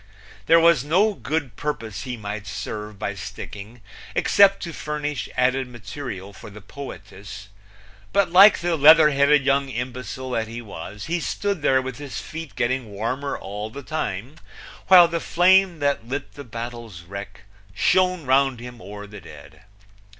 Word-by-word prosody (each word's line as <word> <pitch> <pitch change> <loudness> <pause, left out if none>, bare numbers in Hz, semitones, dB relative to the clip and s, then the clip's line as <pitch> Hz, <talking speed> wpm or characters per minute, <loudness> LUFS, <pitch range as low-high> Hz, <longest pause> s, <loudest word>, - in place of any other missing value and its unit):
There 165 - +7
was 165 -5 +4
no 190 +9 +2
good 145 - -3
purpose 115 -8 -4
he 125 -2 -5
might 105 -1 -6
serve 105 +2 -6
by 100 - -3
sticking, 100 +4 -9 0.3
except 200 -1 +4
to 170 -2 -6
furnish 150 -1 -4
added 130 +1 +1
material 110 -4 -8
for 100 - -11
the 105 +1 -11
poetess, 105 -3 -10 0.6
but 200 -3 +2
like 195 +4 +8
the 175 -1 0
leather 155 +1 +7
headed 140 0 +3
young 140 0 +2
imbecile 125 +1 -5
that 115 -2 -1
he 115 +2 -7
was 105 -1 -8
he 170 +2 -1
stood 200 +1 -2
there 130 -2 +3
with 130 0 -6
his 145 -3 -6
feet 160 -2 -8
getting 125 -1 -1
warmer 120 +8 -3
all 105 +2 -6
the 140 +5 -9
time, 125 -3 -4 0.5
while 180 -2 +9
the 170 0 -2
flame 185 +1 +3
that 140 -5 -1
lit 140 +3 -5
the 145 - -9
battle's 115 -6 -8
wreck 100 +2 -9 0.3
shone 185 - +2
round 135 -1 +2
him 120 0 -10
o'er 105 +2 -9
the 105 -1 -11
dead. - - -14
130 Hz, 160 wpm, -23 LUFS, 105-150 Hz, 0.6 s, while